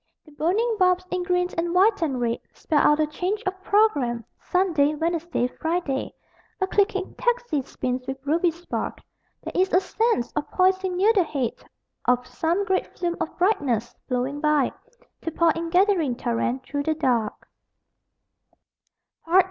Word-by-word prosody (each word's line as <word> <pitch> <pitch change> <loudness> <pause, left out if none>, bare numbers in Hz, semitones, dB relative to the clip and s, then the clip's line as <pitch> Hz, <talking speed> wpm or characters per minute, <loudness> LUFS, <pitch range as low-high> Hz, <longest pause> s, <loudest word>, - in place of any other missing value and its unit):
The 305 - -17
burning 405 +10 0
bulbs, 365 0 +3
in 365 - 0
green 360 0 +1
and 340 +1 -1
white 400 +2 +4
and 275 -6 0
red, 235 -1 0 0.2
Spell 305 -3 +1
out 295 +1 +4
a 310 - +4
Change 365 +8 -3
of 375 0 -3
Program 285 - +2
Sun., 370 -1 0
Wed., 310 +3 +1
Fri., 320 -1 -2 0.4
A 380 - +2
clicking 390 -1 0
taxi 485 - 0
spins 255 -1 -4
with 265 0 -3
ruby 335 +4 +2
spark. 340 +2 -4 0.5
There - - -5
is 375 +1 +2
a 365 - +5
sense 410 - 0
of 300 - -3
poising 375 0 +2
near 415 +5 +4
the 390 -4 +4
head 275 -7 -3 0.4
Of 250 0 +2
some 330 +10 -1
great 380 -1 0
flume 345 -1 -1
of - - -4
brightness, 260 - +1
flowing 260 +3 -2
by 300 -3 +3 0.5
To - - -2
pour 330 +1 +3
in 330 +1 -3
gathering 355 - +3
torrent 240 +1 -1
through 285 +2 -3
the 315 +2 0
dark. 245 -8 -1
330 Hz, 155 wpm, -24 LUFS, 275-375 Hz, 0.5 s, a